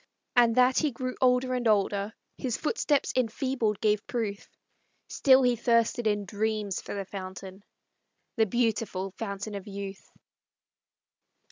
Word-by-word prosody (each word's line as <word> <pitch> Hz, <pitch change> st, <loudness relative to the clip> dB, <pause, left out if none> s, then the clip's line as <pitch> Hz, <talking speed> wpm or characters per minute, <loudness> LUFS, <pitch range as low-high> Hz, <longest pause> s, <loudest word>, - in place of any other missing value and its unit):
And 235 Hz, -2 st, +5 dB
that 255 Hz, +1 st, +4 dB
he 305 Hz, -, +1 dB
grew 255 Hz, 0 st, -4 dB
older 255 Hz, 0 st, +3 dB
and 245 Hz, -2 st, 0 dB
older, 205 Hz, 0 st, +1 dB, 0.2 s
His 250 Hz, -4 st, -2 dB
footsteps 300 Hz, -4 st, 0 dB
enfeebled 240 Hz, -3 st, 0 dB
gave 210 Hz, -1 st, +1 dB
proof, 215 Hz, -4 st, -3 dB, 0.6 s
Still 265 Hz, -1 st, +5 dB
he 245 Hz, -1 st, +3 dB
thirsted 230 Hz, 0 st, +2 dB
in 205 Hz, -1 st, 0 dB
dreams 210 Hz, -1 st, -2 dB
for -, -, -6 dB
the 200 Hz, -1 st, -4 dB
fountain, 190 Hz, 0 st, -8 dB, 0.7 s
The 220 Hz, -2 st, +3 dB
beautiful 220 Hz, -4 st, -1 dB
Fountain 200 Hz, 0 st, -5 dB
of 200 Hz, -1 st, -7 dB
Youth. 195 Hz, -1 st, -7 dB
220 Hz, 130 wpm, -28 LUFS, 200-250 Hz, 0.7 s, And